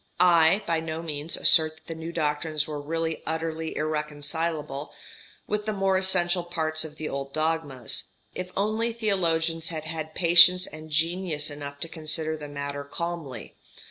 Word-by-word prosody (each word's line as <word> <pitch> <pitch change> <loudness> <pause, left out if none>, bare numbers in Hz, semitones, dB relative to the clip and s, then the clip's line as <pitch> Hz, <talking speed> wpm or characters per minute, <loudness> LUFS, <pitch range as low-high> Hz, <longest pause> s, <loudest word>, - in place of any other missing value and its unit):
I 175 +2 +5
by 165 -1 0
no 160 0 -5
means 155 0 -3
assert 155 -1 +8
that 160 - -23
the 165 - -6
new 165 +1 -7
doctrines 155 -1 -1
were 150 -2 -5
really 165 +2 -3
utterly 160 0 -3
irreconcilable 150 -1 -3 0.5
with 210 0 -3
the 215 - 0
more 195 -1 +1
essential 185 -2 +3
parts 160 -2 -1
of 155 -1 -7
the 155 0 -5
old 140 0 -5
dogmas, 155 -6 -2 0.3
if 185 0 -5
only 220 +3 0
theologians 170 -7 0
had 160 -3 -4
had 155 -1 -6
patience 175 +1 +7
and 155 0 -10
genius 160 -1 0
enough 145 -1 -8
to - - -2
consider 160 -1 -2
the 150 -1 -8
matter 140 0 -5
calmly. 145 - -6
160 Hz, 155 wpm, -26 LUFS, 150-170 Hz, 0.5 s, assert